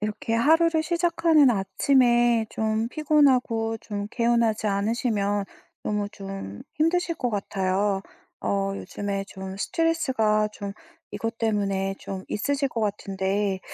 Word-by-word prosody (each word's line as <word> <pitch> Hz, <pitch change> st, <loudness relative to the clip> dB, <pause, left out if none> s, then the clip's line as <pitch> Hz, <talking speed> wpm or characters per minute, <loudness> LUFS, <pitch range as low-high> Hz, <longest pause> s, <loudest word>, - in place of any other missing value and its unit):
이렇게 215 Hz, +2 st, -2 dB
하루를 320 Hz, +6 st, +4 dB
시작하는 335 Hz, -4 st, +3 dB
아침에 240 Hz, +3 st, +3 dB
좀 220 Hz, +1 st, -1 dB
피곤하고 255 Hz, -7 st, +2 dB
좀 205 Hz, -3 st, -5 dB
개운하지 230 Hz, -2 st, +1 dB
않으시면 205 Hz, 0 st, 0 dB, 0.4 s
너무 210 Hz, -1 st, -1 dB
좀 195 Hz, -, -7 dB
힘드실 335 Hz, +2 st, +1 dB
것 250 Hz, -6 st, -2 dB
같아요. 195 Hz, -1 st, 0 dB, 0.4 s
어 195 Hz, 0 st, 0 dB
요즘에 200 Hz, -1 st, -4 dB
좀 190 Hz, -1 st, -8 dB
스트레스가 240 Hz, -8 st, +1 dB
좀 200 Hz, -1 st, -6 dB, 0.4 s
이것 225 Hz, 0 st, -4 dB
때문에 195 Hz, -3 st, 0 dB
좀 190 Hz, -1 st, -6 dB
있으실 275 Hz, +6 st, 0 dB
것 235 Hz, -, -4 dB
같은데 195 Hz, -1 st, -1 dB
220 Hz, 265 characters per minute, -25 LUFS, 200-255 Hz, 0.4 s, 하루를